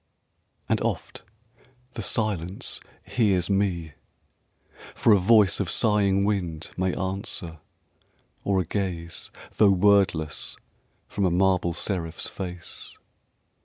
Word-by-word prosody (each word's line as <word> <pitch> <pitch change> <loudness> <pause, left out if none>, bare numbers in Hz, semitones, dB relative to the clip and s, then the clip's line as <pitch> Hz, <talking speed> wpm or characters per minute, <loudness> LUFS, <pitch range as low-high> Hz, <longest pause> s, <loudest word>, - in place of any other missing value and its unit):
And - - +1
oft - - -3 0.7
the 115 - -6
Silence 100 -4 -1 0.3
hears 100 -6 +1
me. 90 -6 0 1.0
For 115 - +5
a 100 - +5
voice 105 0 +5
Of 95 -4 -1
sighing 100 -3 +3
wind 90 -6 -2
may 95 0 0
answer, 95 -3 -4 0.8
or 100 -1 +2
a - - -4
gaze, 85 -3 -3 0.3
Though 105 - +6
wordless, 95 -5 +2 0.5
from 100 - -2
a 95 - +4
marble 90 -1 +2
seraph's 85 -3 -3
face. 90 -2 -7
95 Hz, 105 wpm, -26 LUFS, 85-100 Hz, 1.0 s, Though